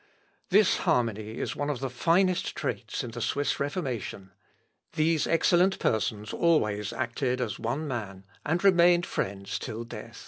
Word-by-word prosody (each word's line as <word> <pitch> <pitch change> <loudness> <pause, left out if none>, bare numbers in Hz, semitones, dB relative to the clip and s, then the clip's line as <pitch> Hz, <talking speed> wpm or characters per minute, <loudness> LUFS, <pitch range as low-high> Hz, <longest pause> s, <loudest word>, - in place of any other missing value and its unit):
This 200 +1 +4
harmony 110 -2 0
is - - -3
one 145 0 -2
of 140 -4 -2
the 135 - -2
finest 175 +8 +1
traits - - -3
in 120 - -6
the 120 +1 -6
Swiss 140 +5 0
Reformation. 130 - -4 0.6
These 160 0 +2
excellent 175 +3 +3
persons 105 -1 -1
always 105 - +1
acted 125 +1 -2
as 120 -5 -3
one 125 +7 -2
man, 100 -7 -5 0.2
and 170 +4 -1
remained 175 -2 +5
friends 100 - -3
till 115 -1 -5
death. 115 - -9
130 Hz, 145 wpm, -28 LUFS, 110-165 Hz, 0.6 s, remained